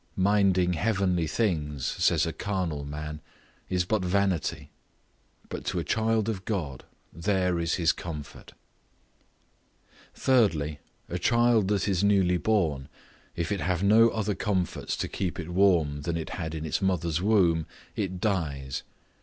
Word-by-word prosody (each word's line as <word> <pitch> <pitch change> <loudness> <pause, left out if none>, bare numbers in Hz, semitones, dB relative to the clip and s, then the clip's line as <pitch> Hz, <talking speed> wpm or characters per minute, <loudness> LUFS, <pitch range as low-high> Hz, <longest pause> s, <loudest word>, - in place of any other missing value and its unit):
Minding 95 -2 +3
heavenly 90 -2 +1
things, 75 - -1
says - - +2
a - - -3
carnal 90 -8 -2
man, 75 +1 -6 0.5
is 90 -1 +1
but 105 0 0
vanity; 95 -3 0 0.8
but - - -6
to - - -2
a - - 0
child 110 -1 +1
of 100 -5 -3
God, 85 - -3 0.3
there 90 +1 0
is 85 0 0
his 85 -3 +3
comfort. 75 -4 -8 1.6
Thirdly, 80 - +2 0.3
A 90 - -3
child 115 0 +3
that 100 -1 0
is 95 -2 +1
newly 95 -3 +3
born, 85 -10 0 0.5
if 85 +1 -2
it 100 - -1
have 90 0 0
not 110 +3 +6
other 105 -1 -1
comforts 95 -2 -2
to - - -2
keep 90 -2 -3
it 85 0 -5
warm 85 -6 +3
than 85 +3 -2
it 80 - -5
had 80 -3 -4
in 80 0 -4
its 80 - -1
mother's 85 -3 0
womb, 90 -6 +3 0.3
it 95 -3 -3
dies. 75 -10 -2
90 Hz, 145 wpm, -27 LUFS, 80-100 Hz, 1.6 s, not